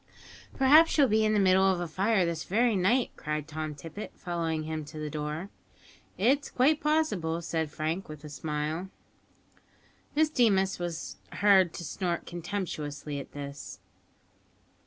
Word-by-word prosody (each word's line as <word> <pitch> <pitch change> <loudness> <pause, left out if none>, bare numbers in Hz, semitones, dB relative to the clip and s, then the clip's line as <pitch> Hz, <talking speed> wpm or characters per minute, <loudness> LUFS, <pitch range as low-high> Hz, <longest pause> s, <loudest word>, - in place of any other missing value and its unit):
"Perhaps 300 +6 +6
you'll 285 -3 +6
be 220 0 +3
in 215 0 +2
the 210 - +3
middle 190 -1 +5
of 190 -2 +3
a 175 - -3
fire 190 +3 +2
this 170 -1 -2
very 230 +3 +2
night," 215 +7 +2
cried 150 -1 -4
Tom 155 -1 -5
Tippet, 165 +8 -8
following 165 -3 -2
him 155 0 -4
to 150 +1 -10
the 150 -1 -4
door. 150 +5 -4 0.7
"It 250 +9 +4
is - - -9
quite 285 +5 +3
possible," 255 - +1
said 160 -2 -1
Frank, 155 +5 -3
with 155 -1 -9
a 150 - -8
smile. 150 +4 -3 1.3
Miss 310 0 +3
Deemas 195 -9 +2
was 175 -2 -5 0.2
heard 195 -4 +5
to - - -6
snort 170 +2 -3
contemptuously 155 -5 -4
at 140 - -10
this. 140 -1 -7
175 Hz, 155 wpm, -29 LUFS, 155-210 Hz, 1.3 s, Perhaps